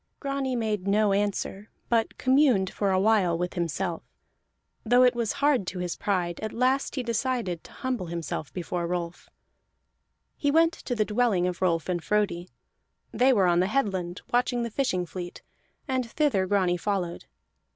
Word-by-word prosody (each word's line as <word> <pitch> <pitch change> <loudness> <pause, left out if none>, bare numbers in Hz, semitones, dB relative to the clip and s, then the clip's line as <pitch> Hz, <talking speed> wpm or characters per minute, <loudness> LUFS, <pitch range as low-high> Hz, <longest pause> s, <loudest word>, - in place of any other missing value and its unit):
Grani 275 -2 -2
made 215 -5 -2
no 205 0 +3
answer, 205 0 -2 0.2
but 230 -2 0
communed 255 -8 +3
for 200 - 0
a 185 -1 +2
while 195 -5 +3
with 180 +1 -2
himself; 170 0 -2 0.8
though 245 +2 +5
it 250 - +5
was 235 -3 -1
hard 280 -9 +2
to 185 - -4
his 180 -1 -3
pride, 180 -4 -1
at 215 -1 -4
last 255 +3 +1
he 260 - -2
decided 235 -7 -1
to - - -14
humble 250 -8 -3
himself 165 -4 -4
before 175 +1 -3
Rolf. 175 -1 -4 1.1
He 285 - 0
went 330 +3 +4
to 245 - -4
the 215 -2 +1
dwelling 210 -5 +1
of 180 -1 -3
Rolf 170 -3 +1
and 175 -3 -2
Frodi; 200 -4 0 0.6
they 260 +2 +4
were 200 -7 +4
on 175 -1 +3
the 185 - +2
headland 190 -7 -1
watching 245 0 +2
the 235 - -4
fishing 205 -8 0
fleet, 175 0 -8 0.4
and 260 -3 -1
thither 245 -10 +1
Grani 185 -3 +2
followed. 180 -3 -2
205 Hz, 165 wpm, -27 LUFS, 180-245 Hz, 1.1 s, though